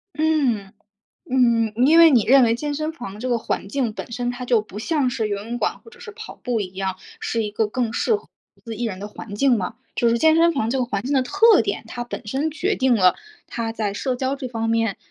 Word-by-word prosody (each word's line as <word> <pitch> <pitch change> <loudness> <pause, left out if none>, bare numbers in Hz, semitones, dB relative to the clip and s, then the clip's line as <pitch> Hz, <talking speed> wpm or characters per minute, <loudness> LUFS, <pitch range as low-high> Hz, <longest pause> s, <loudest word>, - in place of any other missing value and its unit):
嗯， 275 -11 +1 0.6
嗯， 235 -4 +3
因 325 +3 +6
为 330 -1 +9
你 240 -7 +4
认 265 +2 +6
为 230 0 +3
健 295 +2 -3
身 310 +2 -2
房 215 -9 -8
这 255 - -3
个 240 -1 +1
环 200 -3 -3
境， 240 -2 -1
本 235 - -8
身 245 +1 -2
它 250 0 -6
就 240 -2 +3
不 210 -1 -10
像 290 0 0
是 235 -4 -2
游 205 - -1
泳 235 +2 -4
馆 - - -1
或 455 - -16
者 475 0 -18
是 440 - -8
跑 435 +1 -10
步 245 -3 -2
一 185 -2 -5
样， 190 -1 -3 0.2
是 230 -2 -1
一 210 - -5
个 210 0 0
更 235 -1 -2
适 440 - +1
合 420 - -15 0.3
独 - - -27
自 230 -2 -6
一 240 - -4
人 190 -5 -3
的 205 - -6
环 205 0 -9
境 260 0 +3
吗？ 195 +3 -4 0.2
就 235 - +2
是 235 0 +2
健 315 +3 +5
身 335 +1 +4
房 230 -7 -1
这 265 - 0
个 255 - +1
环 205 -5 -3
境 280 - -2
的 265 - +3
特 410 - +5
点， - - -3
它 245 - -5
本 240 - -7
身 275 +9 -1
决 350 +7 -1
定 260 -2 +2
了 185 -3 +4 0.3
它 230 -1 -4
在 215 -3 -3
社 255 +4 -2
交 260 +2 -1
这 270 -2 -6
方 225 -1 -3
面， 225 -3 +1
240 Hz, 280 characters per minute, -22 LUFS, 220-280 Hz, 0.6 s, 为